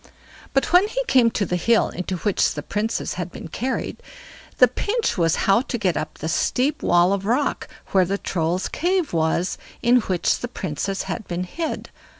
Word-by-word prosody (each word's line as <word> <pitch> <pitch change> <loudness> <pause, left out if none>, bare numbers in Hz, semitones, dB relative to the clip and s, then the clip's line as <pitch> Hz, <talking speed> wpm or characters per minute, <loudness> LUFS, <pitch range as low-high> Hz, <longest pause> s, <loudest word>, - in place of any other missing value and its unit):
But 270 - +1
when 365 +3 +6
he - - -2
came 250 - +4
to 220 -2 -1
the 180 - -1
hill 225 +6 +3
into 185 +1 -4
which 205 +2 +1
the - - -4
Princess 215 +3 -2
had 175 0 -5
been - - -8
carried, 255 +9 -3 0.6
the - - +7
pinch 450 +2 -1
was 165 -3 +2
how 195 +4 +5
to 250 - -3
get 190 -7 0
up 155 - -4
the 160 - -5
steep 255 - 0
wall 175 +2 +4
of 200 -1 -2
rock 255 +6 0 0.2
where 190 -1 +5
the 195 +3 -1
Troll's 175 -1 -1
cave 355 - 0
was, 165 +2 0 0.2
in 245 +1 +5
which 190 -7 +1
the 245 - -4
Princess 195 - -3
had 220 - -5
been 175 +1 -2
hid. 320 - -4
200 Hz, 185 wpm, -23 LUFS, 175-255 Hz, 0.6 s, the